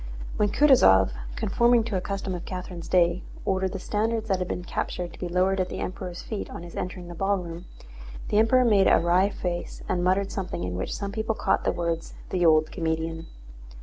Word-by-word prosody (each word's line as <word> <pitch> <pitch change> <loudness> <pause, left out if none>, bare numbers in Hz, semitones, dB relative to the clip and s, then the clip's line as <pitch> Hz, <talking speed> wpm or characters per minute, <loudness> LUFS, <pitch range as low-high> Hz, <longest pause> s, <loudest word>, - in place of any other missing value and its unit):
When 210 - +2
Kutúzov, 150 - +5 0.2
conforming 235 +2 +3
to 225 -3 -3
a 185 - 0
custom 195 0 -3
of 175 - -5
Catherine's 180 -2 -6
day, 175 0 +3 0.2
ordered 190 -1 0
the - - -3
standards 220 +3 -1
that 190 -1 +2
had 180 - -2
been 180 - -4
captured 175 0 -4
to - - -14
be 180 - -3
lowered 185 +2 +2
at 185 - 0
the - - -5
Emperor's 180 -1 -5
feet 215 -3 -5
on - - -8
his 175 - -10
entering 180 -1 -5
the 175 - -7
ballroom, 180 -2 -2 0.6
the 210 - +3
Emperor 250 +3 +4
made 205 -4 +5
a - - +6
wry 180 +3 +3
face 175 -3 -4
and 175 -1 0
muttered 190 +2 +1
something 180 - -4
in 90 0 -3
which 95 - -3
some 200 -1 -4
people 220 +1 -2
caught 195 - 0
the - - +3
words, 170 -1 -3 0.2
"the 180 -1 +1
old 155 -1 +4
comedian." 165 -1 -2
185 Hz, 205 wpm, -26 LUFS, 170-200 Hz, 0.6 s, a